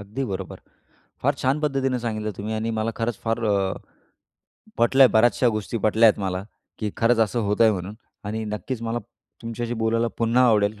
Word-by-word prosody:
अगदी 105 +7 -4
बरोबर. 95 -1 -6 0.6
फार 140 +2 +3
छान 135 +3 +1
पद्धतीने 135 -4 0
सांगितलं 110 -2 -3
तुम्ही 110 +2 -4
आणि 110 +1 -2
मला 115 +1 -1
खरंच 115 -2 -2
फार 115 0 -1
अ, 105 - +2 1.3
पटल्या. 130 +3 +6
बऱ्याचशा 120 +2 +4
गोष्टी 110 +2 -4
पटल्या 110 +1 +5
आहेत 105 - +1
मला, 95 0 -2 0.3
की 105 -2 -2
खरंच 115 0 +3
असं 120 - -2
होतंय 110 +1 +4
म्हणून 95 +2 -5 0.3
आणि 110 +2 -3
नक्कीच 110 +3 -5
मला 115 +1 -2 0.4
तुमच्याशी 115 +1 -4
बोलायला 115 +1 +1
पुन्हा 120 +2 +3
आवडेल. 105 -1 +2
115 Hz, 165 wpm, -24 LUFS, 105-120 Hz, 1.3 s, पटल्या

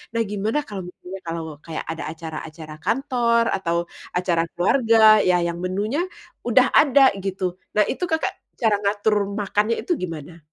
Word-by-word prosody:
Nah 230 - +2
gimana 210 +7 -1
kalau 195 -8 -7
misalnya 180 +1 -9
kalau 165 0 -3 0.2
kayak 160 -1 -5
ada 160 +1 -5
acara-acara 160 -1 -8
kantor 240 - +1
atau 170 -3 -1 0.4
acara 180 -2 +1
keluarga 220 +2 +5
ya, 180 -3 +3
yang 170 0 -2
menunya 200 - -1 0.5
udah - - +4
ada 280 -1 +5 0.2
gitu, 190 -1 -3 0.3
nah 210 - +5
itu 360 - -1
Kakak 320 -2 0 0.3
cara 220 -3 +4
ngatur 205 +1 +1 0.2
makannya 210 +2 +1
itu 355 - 0
gimana? 165 -1 -6
200 Hz, 150 wpm, -23 LUFS, 170-230 Hz, 0.5 s, keluarga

